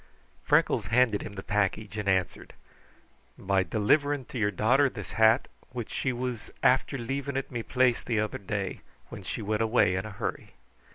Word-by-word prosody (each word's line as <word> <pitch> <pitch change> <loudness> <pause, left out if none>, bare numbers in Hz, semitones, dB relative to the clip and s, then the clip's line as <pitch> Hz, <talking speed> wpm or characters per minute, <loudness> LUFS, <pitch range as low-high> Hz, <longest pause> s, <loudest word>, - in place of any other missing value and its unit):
Freckles - - +2
handed 115 -2 +3
him 100 - -7
the 95 -1 -7
package 105 +1 -1
and 105 -2 -2
answered, 95 -3 -1 0.8
"By 95 0 +1
delivering 135 - +1
to 125 - -5
your 105 -1 +2
daughter 125 +8 +3
this 105 -6 -8
hat, 110 0 +4 0.3
which 120 -3 -5
she 130 - -1
was 125 -2 -4
after 130 +2 +3
leaving 135 +3 -3
at 135 - -4
me 120 -2 -3
place 125 0 +2
the 115 -3 -1
other 105 0 -2
day, 100 -1 -4 0.3
when - - -8
she - - -5
went 105 +1 -1
away 110 -4 +3
in 95 +3 -2
a - - -7
hurry. 100 - -5
110 Hz, 175 wpm, -28 LUFS, 105-125 Hz, 0.8 s, hat